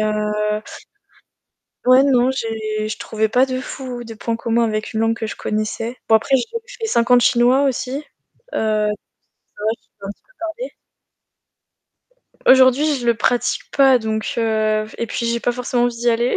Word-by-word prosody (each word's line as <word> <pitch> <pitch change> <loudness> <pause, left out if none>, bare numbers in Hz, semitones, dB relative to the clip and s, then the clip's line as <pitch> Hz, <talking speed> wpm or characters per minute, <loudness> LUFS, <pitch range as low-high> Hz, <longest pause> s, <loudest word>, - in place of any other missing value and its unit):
heu 210 0 -1 1.2
Ouais, 255 +2 +6
non, 255 -2 +3
j'ai 220 -4 -3
je 215 - -4
trouvais 220 0 -1
pas 250 +4 +4
de 255 -1 -3
fou, 255 -2 -7
de 225 -1 -9
point 230 +1 -3
commun 230 0 0
avec 215 -2 -2
une 220 - 0
langue 225 0 +1
que 225 - -4
je - - -5
connaissais. 215 +3 -3
Bon, 225 - +5
après, 245 +5 +4
j'ai 250 - 0 0.4
fais 450 - -1
5 235 - +1
ans 250 - +8
de 245 - +4
chinois 245 +4 +4
aussi. 255 -2 -1
Heu - - -8 0.5
ça 215 -1 +1 0.8
va 215 - +2
je - - -37
peux 200 - -11
un - - -4
petit - - -18
peu - - -29
parler. 335 +9 -5 1.8
Aujourd'hui, 265 +3 +5
je 245 -2 -5
le 235 - +4
pratique 240 +3 0
pas, 270 -2 +6
donc 220 -2 -3
heu 215 -2 +1
et 235 - -2
puis 235 - -3
j'ai 235 0 0
pas 245 - 0
forcément 245 0 0
envie 245 -1 -1
d'y 240 +1 +1
aller. 235 +2 +1
235 Hz, 185 wpm, -20 LUFS, 220-255 Hz, 1.8 s, ans